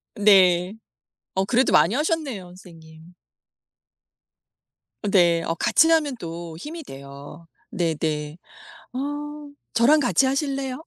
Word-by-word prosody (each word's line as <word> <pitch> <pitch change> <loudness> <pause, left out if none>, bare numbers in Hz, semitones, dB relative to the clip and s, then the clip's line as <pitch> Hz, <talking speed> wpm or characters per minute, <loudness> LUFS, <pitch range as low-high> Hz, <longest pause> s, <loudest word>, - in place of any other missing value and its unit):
네. 190 -2 +4 0.6
어 190 0 +1
그래도 250 +5 +2
많이 225 - +4
하셨네요 295 - -2
선생님. 165 -2 -16 1.9
어 210 - -4
네. 170 -4 +3
어 165 - -2
같이 320 - +3
하면 305 -5 +2
또 165 -1 -7
힘이 315 - -8
돼요. 140 - -12 0.2
네네. 155 -2 -2 0.6
아. 290 +2 -5 0.2
저랑 275 +7 +4
같이 265 0 +2
하실래요? 275 0 -2
200 Hz, 205 characters per minute, -23 LUFS, 165-280 Hz, 1.9 s, 네